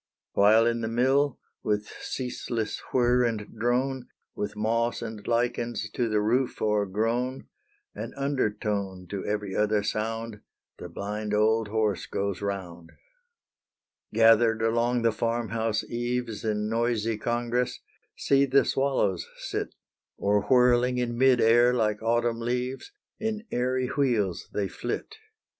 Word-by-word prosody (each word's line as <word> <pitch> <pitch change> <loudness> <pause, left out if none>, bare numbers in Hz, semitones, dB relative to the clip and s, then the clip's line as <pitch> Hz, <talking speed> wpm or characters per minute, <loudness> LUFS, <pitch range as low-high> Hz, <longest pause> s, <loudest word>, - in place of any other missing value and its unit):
While 110 +3 +5
in 115 0 +1
the 110 - -1
mill, 130 +4 +2 0.2
with 105 0 -1
ceaseless 120 -3 -3
whirr 125 0 +3
and 110 -3 -2
drone, 125 +2 0 0.3
With 105 - -4
moss 115 +2 0
and 110 -2 -6
lichens 120 -2 -1
to 120 0 -1
the 105 -1 +2
roof 120 +5 +1
o'ergrown 110 +5 0 0.5
An - - -6
undertone 105 -8 -1
to 100 -1 -3
every 105 -2 -3
other 105 0 +2
sound, 110 0 -3 0.4
The - - -7
blind 105 +1 -3
old 110 +1 +3
horse 105 -2 0
goes 100 -1 -2
round 90 -4 -5 1.2
Gathered 115 0 +5
along 115 +1 +1
the 115 - +4
farm 115 0 -1
house 110 0 -1
eaves 120 -2 -3
In 105 -1 -1
noisy 115 -1 0
congress, 120 +2 -1 0.4
see 140 0 +3
the 135 +1 +4
swallows 130 -10 0
sit, - - -4 0.4
Or 100 +1 +2
whirling 125 -1 +4
in 120 -1 -1
mid 130 0 +4
air 120 +2 +5
like 105 -3 0
autumn 115 +1 +1
leaves, 125 - -3 0.3
In 220 0 -3
airy 130 +1 0
wheels 120 - 0
they 100 -2 -1
flit. 120 - -5
115 Hz, 130 wpm, -27 LUFS, 105-125 Hz, 1.2 s, While